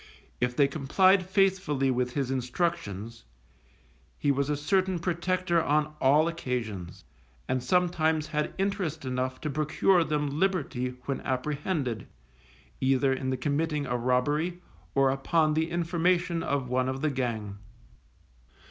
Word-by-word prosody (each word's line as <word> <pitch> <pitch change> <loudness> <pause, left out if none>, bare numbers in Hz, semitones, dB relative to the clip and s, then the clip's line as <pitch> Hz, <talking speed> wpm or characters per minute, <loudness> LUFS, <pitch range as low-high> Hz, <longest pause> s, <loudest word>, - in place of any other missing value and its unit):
If 125 0 0
they 140 0 +4
complied 185 +7 +3
faithfully 185 -9 +2
with 125 0 -1
his 135 -3 -1
instructions, 120 - -2 0.9
he 145 - +2
was 140 +1 0
a 150 - 0
certain 185 +4 +1
protector 175 0 0
on 150 +1 +1
all 145 +4 +5
occasions, 115 - -4 0.4
and 130 -1 0
sometimes 160 0 +1
had 150 -1 -2
interest 190 -7 -2
enough 130 0 -2
to 155 - -2
procure 155 +5 +2
them 150 -1 -1
liberty 140 -10 0
when 135 -2 -2
apprehended, 135 - -2 0.7
either 135 0 +2
in 130 0 -3
the 130 - -1
committing 145 +2 -1
a 125 -2 -2
robbery, 145 +9 0 0.3
or 135 -1 +4
upon 155 +3 +1
the 160 +1 0
information 170 0 +1
of 140 -4 -1
one 130 +1 0
of 130 0 -3
the 155 -1 +1
gang. 110 -6 -3
145 Hz, 130 wpm, -28 LUFS, 130-170 Hz, 0.9 s, all